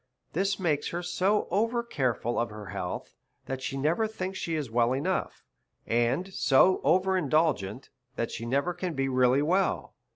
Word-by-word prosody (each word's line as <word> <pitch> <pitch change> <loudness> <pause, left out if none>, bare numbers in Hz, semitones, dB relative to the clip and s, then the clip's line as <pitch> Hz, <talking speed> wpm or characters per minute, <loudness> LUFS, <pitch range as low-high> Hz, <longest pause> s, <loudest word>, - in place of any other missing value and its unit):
This 195 +4 0
makes 160 -6 0
her 175 +1 -3
so 185 +4 +1
over 230 +3 +1
careful 125 - -1
of 120 - 0
her 105 -3 -9
health, 90 - -5 0.3
that 130 0 -4
she 135 +1 -3
never 165 +11 +1
thinks 190 -3 -5
she 165 - -2
is 150 -3 -2
well 120 +1 +3
enough; 175 +8 -2 0.4
and 125 +11 0
so 180 +6 +4
over 190 +2 +3
indulgent, 145 - 0 0.2
that 115 - -2
she 115 - -5
never 140 +8 +1
can 175 -2 -4
be 135 0 0
really 130 +1 +3
well. 185 +5 0
155 Hz, 165 wpm, -28 LUFS, 130-185 Hz, 0.4 s, so